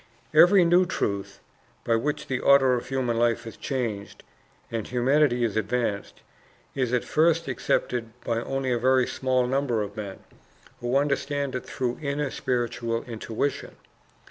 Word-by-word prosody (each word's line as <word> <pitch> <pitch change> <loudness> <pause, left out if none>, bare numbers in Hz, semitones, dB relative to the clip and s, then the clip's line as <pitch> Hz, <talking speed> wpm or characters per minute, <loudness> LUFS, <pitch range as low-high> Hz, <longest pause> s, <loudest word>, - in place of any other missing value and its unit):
Every 180 0 +7
new 175 +2 +4
truth, 100 - -3 0.4
by 115 - +2
which 145 +6 -2
the 130 -1 -2
order 135 -2 +5
of 120 - -2
human 125 -4 0
life 115 -1 +1
is 115 - -8
changed 115 -7 -4 0.5
and 115 -2 -3
humanity 125 0 +2
is 110 -4 -1
advanced, 110 -1 -2 0.5
is 130 -3 -1
at 125 -1 +1
first 165 0 +2
accepted 120 -2 -1
by 115 0 0
only 135 0 -2
a 120 - +1
very 130 +1 +3
small 130 -1 0
number 125 -4 0
of 100 0 -8
men 100 -3 -7 0.6
who 120 +2 0
understand 140 0 -1
it 125 - -5
through 125 -1 -3
inner 140 -1 -2
spiritual 120 -1 -2
intuition. 115 +3 -4
125 Hz, 145 wpm, -26 LUFS, 115-140 Hz, 0.6 s, Every